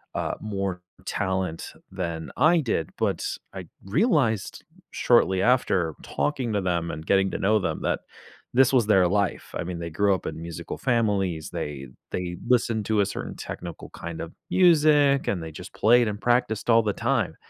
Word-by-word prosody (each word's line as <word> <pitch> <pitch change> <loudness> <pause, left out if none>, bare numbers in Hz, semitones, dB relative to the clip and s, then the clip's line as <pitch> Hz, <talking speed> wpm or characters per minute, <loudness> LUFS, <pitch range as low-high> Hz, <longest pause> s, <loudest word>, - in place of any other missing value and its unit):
uh, - - -1
more 100 -4 -3 0.2
talent 95 -4 -2 0.2
than 85 -4 -4
I 160 +6 +5
did, 95 - -2
but - - -1 0.3
I - - -7 0.2
realized, 130 - +1 0.3
shortly 95 -6 +3
after 100 -9 +2
talking 135 -6 -2
to 100 - +1
them 85 -2 -1
and 80 +1 -7
getting 95 0 +3
to - - -2
know 105 +3 +3
them 80 -5 -2
that - - 0 0.5
this 130 +1 +5
was 120 -5 +4
their 95 -4 +5
life, 100 +1 -1
I - - -2
mean, 85 0 -5
they 85 0 -4
grew 100 +4 +2
up - - -8
in 80 - -5
musical 85 0 -6
families, 100 - 0
they 70 -2 -5 0.2
they 90 -1 -3
listened 115 -4 +2
to 110 -2 +2
a 100 - +2
certain - - -5
technical 85 -2 -7
kind 85 -1 -7
of 80 - -7 0.2
music, 150 -6 +4
and 90 -4 0
they 80 - -7
just - - -10
played 120 +2 +4
and 105 -1 -4
practiced 120 -2 +1
all 115 -1 +6
the 105 - 0
time. - - 0
100 Hz, 175 wpm, -25 LUFS, 85-120 Hz, 0.5 s, all